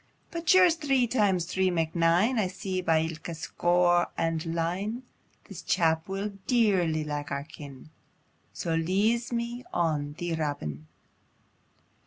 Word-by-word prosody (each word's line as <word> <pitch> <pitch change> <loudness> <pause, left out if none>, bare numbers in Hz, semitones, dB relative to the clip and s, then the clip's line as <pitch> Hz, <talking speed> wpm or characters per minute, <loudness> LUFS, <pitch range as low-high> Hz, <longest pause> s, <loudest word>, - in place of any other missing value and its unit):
"But 335 -2 -4
sure 370 0 +8
as 345 - +4
three 270 -5 +2
times 205 -8 +1
three 185 +1 +1
mak 165 -2 -1
nine, 175 +9 +3
I 200 - +1
see 185 0 -4
by 165 -3 +2
ilka 165 +1 -5
score 175 +2 +2
and 165 -1 0
line, 190 +9 -2 0.4
This - - -9
chap 160 -2 +1
will 195 +2 -3 0.2
dearly 185 -10 +2
like 145 -1 -4
our 140 0 -3
kin', 145 -1 -12 0.6
So 165 - -3
leeze 205 +9 +1
me 235 +1 -3
on 150 -4 -1
thee! 175 +1 -4
Robin." 80 - -4
175 Hz, 140 wpm, -28 LUFS, 160-210 Hz, 0.6 s, sure